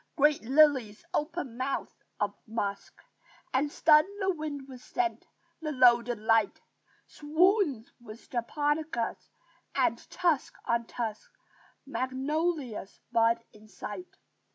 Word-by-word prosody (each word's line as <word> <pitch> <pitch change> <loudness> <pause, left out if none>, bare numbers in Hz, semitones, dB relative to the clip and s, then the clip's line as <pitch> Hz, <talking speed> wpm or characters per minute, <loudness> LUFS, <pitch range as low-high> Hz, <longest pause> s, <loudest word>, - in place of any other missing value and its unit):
Great 295 0 +4
lilies 260 -4 +3
open 300 -5 -2
mouths 265 +1 -2 0.3
of - - 0
musk 205 -3 -3 0.6
And 285 +3 +1
stun 305 0 +6 0.2
the 385 -1 +1
wind 300 -4 -5
with 255 -2 -11
scent; 355 +4 -2 0.3
the 305 -1 -2
loaded 240 -3 +5
light 220 -1 +2 0.5
Swoons 310 - +2
with 225 -1 -12
japonicas; 290 +1 -1 0.5
and, - - +2
tusk 340 -6 0
on 235 0 0
tusk, 220 -3 -4 0.6
Magnolias 270 - -2
bud 230 0 +3
in 215 0 -17
sight. 210 - -8
265 Hz, 105 wpm, -29 LUFS, 230-305 Hz, 0.6 s, stun